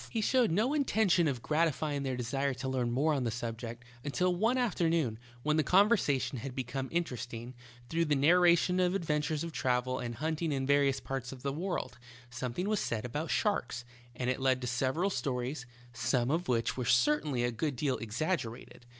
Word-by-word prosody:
'' - - -15
He 230 - -2
showed 250 +2 +3
no 215 - +1
intention 220 - +3
of 130 -5 -2
gratifying 155 -2 0
their 130 -2 -2
desire 135 +3 -1
to 130 +2 -5
learn 130 -2 0
more 145 +6 +2
on 135 -3 0
the 120 - 0
subject, 115 +1 -5 0.2
until 180 +5 +1
one 225 +7 +2
aft 245 -6 0
ernoon, 165 -9 +1 0.3
when 150 +1 +2
the 155 - +3
conversation 180 - +3
had 130 +2 -6
become 130 +1 -3
inter 170 -6 -1
esting, 120 +1 -7 0.3
through 165 +3 +1
the 150 -2 +2
narration 175 +4 +4
of 180 +1 +2
adventures 150 -3 -1
of 170 - -4
travel 130 -1 0
and 120 -1 -4
hunting 160 +3 -1
in 135 -2 -1
variotis 140 -1 +2
parts 130 -2 -4
of 130 -2 -10
the 140 -1 -1
world, 175 -6 -3 0.3
something 125 +9 -3
was 215 -1 +1
said 115 0 -2
about 150 +6 -3
sharks, 125 - 0 0.3
and 125 0 -3
it 130 - -3
led 130 -1 +3
to - - -3
several 130 +10 0
stories, 125 -1 -3 0.3
some 120 +2 0
of 170 +3 0
which 115 -2 +1
were 125 - -2
certainly 130 +1 +2
a 120 - +1
good 140 +5 -2
deal 130 0 -1
exaggerated. 120 - -3
140 Hz, 195 wpm, -31 LUFS, 125-170 Hz, 0.3 s, narration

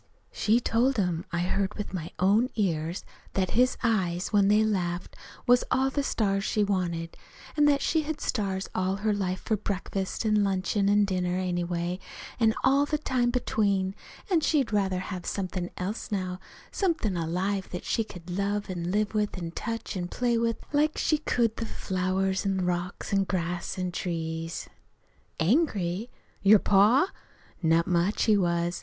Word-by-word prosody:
She 220 +3 +2
told 245 +2 +1
him 180 -4 0
I 170 -1 0
heard 190 +2 0
her - - -11
with 210 - -5
my 170 -3 -4
own 210 +7 +3
ears 170 -4 -1 0.3
that 185 -2 0
his 250 +3 +3
eyes, 185 -6 +1
when 200 -1 +5
they 210 +2 +5
laughed, 180 -5 -1 0.3
was 245 0 +5
all 265 +1 +2
the 285 - 0
stars 195 -7 0
she 210 0 +1
wanted; 175 -4 -1 0.4
an' 295 -1 +4
that 285 -1 +3
she'd 315 -2 +1
had 310 -1 -3
stars 195 -4 -1
all 185 +1 0
her 210 +2 0
life 185 -2 -2
for 220 - 0
breakfast 195 0 -3
an' 215 -1 +3
luncheon 195 +1 +1
an' 205 0 +4
dinner, 180 -2 -1
anyway, 175 -1 -2 0.4
an' 225 -2 +3
all 275 +2 +4
the 300 - 0
time 255 -5 0
between; 200 -6 +1 0.4
an' 345 - +5
she'd 280 -7 +1
rather 195 -3 +1
have 185 -1 -5
somethin' 185 -2 -3
else, 205 +5 -4
now 185 -2 -2 0.3
somethin' 325 - 0
alive, 185 +4 -1
that 180 - -6
she 225 - +1
could 180 -5 -12
love 200 +2 -1
an' 175 -1 -3
live 210 +3 0
with 210 -2 0
an' 170 -2 -4
touch 230 +4 -4
an' 175 -2 -2
play 240 +5 0
with, 230 0 +1 0.2
like 300 +2 +2
she 310 - +2
could 235 -6 +1
the 230 - -2
flowers 190 0 -1
an' 190 -2 0
rocks 180 +2 -3
an' 195 0 +4
grass 175 -2 -2
an' 180 -1 -2
trees. 165 -2 -3 0.7
"Angry? 205 - +1 0.3
Your 205 +2 +7
pa? 210 - +4 0.5
Not 165 0 +3
much 180 +3 +1
he 215 - +4
was! 175 -2 0
195 Hz, 170 wpm, -28 LUFS, 180-220 Hz, 0.7 s, Your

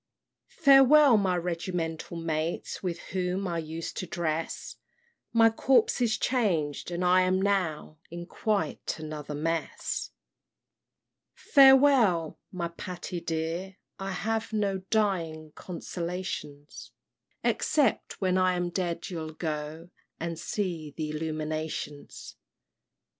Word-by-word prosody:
"Farewell, 280 - +6
my 190 -4 +2
regimental 170 -1 -3
mates, 165 0 -3
With 175 -3 -2 0.2
whom 185 +1 -1
I 170 -1 -1
used 160 +1 -5
to 185 - -3
dress! 165 -1 -3 0.5
My 225 -1 +5
corps 245 +1 +3
is 220 -3 +2
changed, 175 - 0
and 175 +1 -2
I 180 +1 +5
am 185 +1 +2
now 180 -6 -1
In 175 +1 -7
quite 200 -4 -2
another 155 -2 -6
mess. 165 +2 -2 1.3
"Farewell, 265 - +5
my 175 -2 -3
Patty 175 0 -6
dear, 170 +4 -3 0.2
I 195 0 -4
have 225 +5 -2
No 200 -3 0
dying 165 -8 0
consolations, 170 -4 -6 0.5
Except, 285 -8 +1
when 185 -1 +2
I 185 0 +3
am 175 0 -1
dead, 175 -2 -2
you'll 160 -2 -5
go 155 +1 -5 0.3
And 165 -1 -4
see 170 -5 -3
th' - - -21
Illuminations." 155 -1 -5
175 Hz, 110 wpm, -28 LUFS, 160-195 Hz, 1.3 s, Farewell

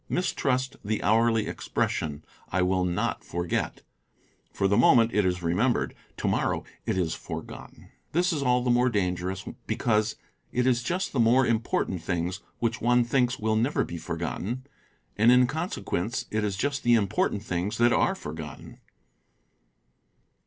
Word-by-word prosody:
Mistrust 130 -7 0
the 110 +1 -2
hourly 115 +2 +3
expression, 75 0 -2 0.3
"T 95 - +1
will 90 0 +1
not 90 0 -1
forget''; 85 0 -3 0.7
for 95 - +1
the 100 - +2
moment, 115 0 +5
it 105 -2 +3
is 90 -1 -1
remembered; 105 +10 +1 0.2
tomorrow, - - 0 0.2
it - - 0
is 85 -3 0
forgotten. - - -9 0.2
This 175 +3 +2
is 150 - -2
all 125 -2 +2
the 125 - +2
more 125 +1 +4
dangerous 95 -3 -1 0.2
because 110 -1 +1 0.4
it 125 0 +1
is 125 -2 +3
just 180 +9 -2
the 135 - 0
more 120 +3 +5
important 110 -6 0
things 90 +2 -2 0.2
which 115 -1 -1
one 120 +1 +4
thinks 125 0 +1
will 110 0 0
never 120 +7 +1
be 85 - -6
forgotten, 90 +11 -4 0.5
and 115 +3 +6
in 125 0 +6
con 160 +7 -2
sequence 110 +8 -2
it 110 0 0
is 100 -2 -1
just 140 +6 -1
the 120 0 +4
important 100 -1 0
things 95 +2 -2
that 120 +1 +4
are - - +2
forgotten. 75 -1 -8
110 Hz, 150 wpm, -27 LUFS, 90-125 Hz, 0.7 s, and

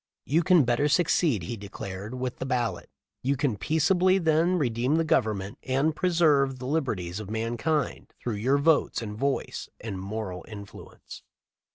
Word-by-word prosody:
"You 160 +5 +2
can 175 -2 +5
better 125 +4 +2
succeed," 150 - +2
he 115 - -4
declared, 100 +1 -7
"with 125 -1 -3
the - - -4
ballot. 120 -8 -1 0.3
You 135 +2 0
can 130 -5 0
peaceably 175 - +3
then 165 +1 +2
redeem 125 -1 +1
the 165 0 +2
Gov 130 -6 +3
ernment 100 -2 -4
and 135 +4 0
preserve 155 -7 +3
the 125 - -7
liberties 110 - -2
of 105 -2 -7
mankind 120 +7 -2
through 115 -4 -3
your 130 +7 +2
votes 145 -4 +2
and 105 -1 -5
voice 135 +4 -2
and 105 -4 -5
moral 100 -2 -5
influence. 100 -2 -11
130 Hz, 160 wpm, -27 LUFS, 110-155 Hz, 0.3 s, can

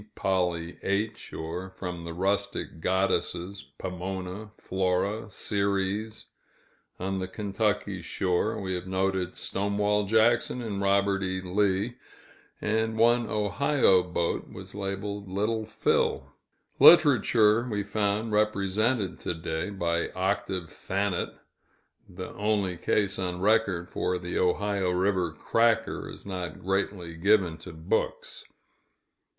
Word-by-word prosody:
"Polly 90 -3 -1
H.," 105 +3 -2
or 85 +4 -5
from 90 -2 -6
the 85 - -5
rustic 95 -2 -1
goddesses, 95 0 0
"Pomona," 95 +3 -5
"Flora," 95 +4 -1
"Ceres;" 100 +2 -1 0.7
on 95 +1 -2
the 95 - -3
Kentucky 105 -1 -1
shore, 90 +1 0
we 95 -1 -3
have 90 0 -4
noted 95 -1 -1
"Stonewall 105 +1 0
Jackson," 115 +3 +3
and 105 -5 -3
"Robert 100 0 +2
E. 95 0 -1
Lee," 100 +4 0 0.6
and 110 +1 0
one 120 +1 +4
Ohio 105 0 +3
boat 85 -1 -2
was - - -9
labeled 100 0 -4
"Little 110 +3 -1
Phil." 110 - 0 0.5
Literature 120 -7 +6
we 105 -2 -1
found 105 +2 -1
represented 105 0 +1
to - - -3
day, 80 +2 -3
by 85 -4 -1
"Octave 95 -2 -1
Thanet" 95 -1 -2 0.8
the 90 +1 -7
only 105 -3 0
case 100 +3 0
on 90 -1 -2
record, 100 -4 +2
for 90 - -1
the 90 0 -3
Ohio 95 +1 +1
River 90 -1 +1
"cracker" 115 +8 +1
is - - -11
not 90 -5 -5
greatly 95 -2 -2
given 90 -1 +3
to 80 - -9
books. 80 0 -2
95 Hz, 115 wpm, -28 LUFS, 90-105 Hz, 0.8 s, Literature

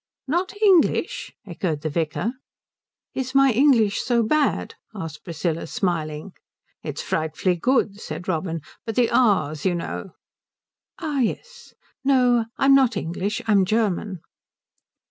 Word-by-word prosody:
"Not 365 +7 -1
English?" 415 +6 +3
echoed 170 -5 -3
the 155 - -2
vicar. 165 +9 -1 0.8
"Is 260 0 -4
my 275 -1 +6
English 230 -5 +3
so 240 -2 +2
bad?" 295 +6 +1 0.2
asked 160 -6 -7
Priscilla, 165 -1 -3
smiling. 160 -1 -2 0.5
"It's - - -5
frightfully 160 +3 0
good," 210 0 +1
said - - -7
Robin; 165 -2 -2 0.2
"but 225 - -5
the 245 -2 +2
'r's,' 155 - +2
you 185 -2 +1
know 170 - -5 0.4
" - - -32
"Ah, 295 -3 -1
yes. 475 - -3 0.3
No, 250 -4 +3
I'm 275 0 +5
not 260 -5 +4
English. 195 +6 -3
I'm 205 -3 +4
German." 200 -3 -1
210 Hz, 125 wpm, -23 LUFS, 170-265 Hz, 0.8 s, my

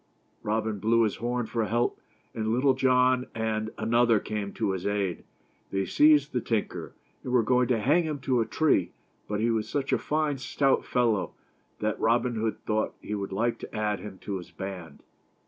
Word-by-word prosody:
Robin 110 -1 -1
blew 115 +3 +3
his 110 - 0
horn 120 0 -1
for 115 0 -1
help, 120 +4 0 0.3
and 110 -1 -3
Little 130 +4 +3
John 130 -1 +3
and 110 -1 -1
another 120 -1 +3
came 105 -1 -4
to 105 -3 -1
his 95 0 -3
aid. 100 -4 -1 0.4
They 95 0 -1
seized 150 -1 +4
the 125 - 0
tinker, 110 -2 -3 0.3
and 125 - -4
were 125 -2 +4
going 125 +2 +3
to 120 - +2
hang 150 +10 +3
him 155 -2 -2
to 130 -2 +1
a 115 - -1
tree, 120 - +2 0.3
but 105 0 -2
ne 115 +1 +2
was 110 -1 -1
such 140 -2 -1
a - - +3
fine, 150 -2 -1
stout 135 +1 +1
fellow 115 -6 +1 0.5
that 105 0 -1
Robin 120 +2 +2
Hood 110 -1 -1
thought 110 0 0
he 105 - -6
would 100 -2 -3
like 115 +5 0
to - - -9
add 105 -1 0
him 105 -2 -9
to 100 -2 -3
his 90 - -9
band. 90 -6 -8
115 Hz, 190 wpm, -27 LUFS, 105-125 Hz, 0.5 s, seized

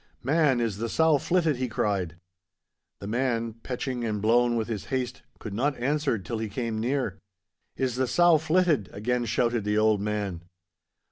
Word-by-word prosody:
'Man, 145 -1 +3
is 115 -4 -1
the 115 +2 -3
sow 160 0 +3
flitted?' 165 -5 +1
he 130 0 -1
cried. 100 -7 -1 0.8
The - - -9
man, 115 0 -1
peching 125 0 -3
and 110 -2 -1
blown 120 +3 +3
with 110 -2 -1
his 110 -4 -4
haste, 130 -2 -3 0.2
could 110 - -7
not 135 +6 0
answer 140 0 0
till 105 +4 -5
he 110 -1 -3
came 115 0 -3
near. 120 -5 -1 0.6
'Is 125 -2 -1
the 130 0 +1
sow 165 +6 +5
flitted?' 160 - +2
again 120 +4 -1
shouted 120 0 +1
the 105 +1 0
old 110 -2 +3
man. 100 -4 -2
120 Hz, 165 wpm, -27 LUFS, 110-135 Hz, 0.8 s, sow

